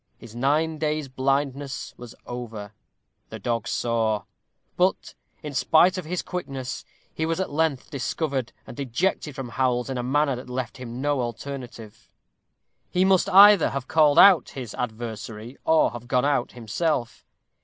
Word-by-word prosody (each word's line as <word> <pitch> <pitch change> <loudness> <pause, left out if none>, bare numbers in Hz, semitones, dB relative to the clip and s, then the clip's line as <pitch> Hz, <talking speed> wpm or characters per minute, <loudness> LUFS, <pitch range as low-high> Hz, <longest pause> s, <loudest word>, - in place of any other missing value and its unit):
His 115 -1 -13
nine 150 +5 +1
days' 155 -2 -1
blindness 135 0 -2
was 120 -1 -11
over. 110 -4 -7 0.6
The - - -7
dog 115 -2 -2
saw. 115 -3 0 0.5
But, 185 +2 0 0.3
in 150 -1 -6
spite 175 +6 +4
of 185 -3 -5
his 180 +3 -3
quickness, 135 -8 -5 0.3
he 160 - -3
was 165 +2 -1
at 190 - -2
length 150 -3 -1
discovered, 135 -1 -2
and 120 - -11
ejected 140 +3 -1
from 130 -2 -6
Howell's 125 0 0
in 130 - -3
a - - 0
manner 140 +2 +1
that 125 - -10
left 125 -1 -4
him 125 0 -7
no 145 -2 +1
alternative. 120 -2 -7 0.8
He 180 +1 +2
must 190 0 +3
either 200 -2 +8
have 135 -1 -5
called 155 -1 +4
out 180 -5 +7
his 125 -5 -7
adversary, 115 0 -6
or 160 0 +4
have 120 0 -9
gone 125 +1 +2
out 145 -4 0
himself. 120 +2 -2
135 Hz, 155 wpm, -25 LUFS, 120-155 Hz, 0.8 s, either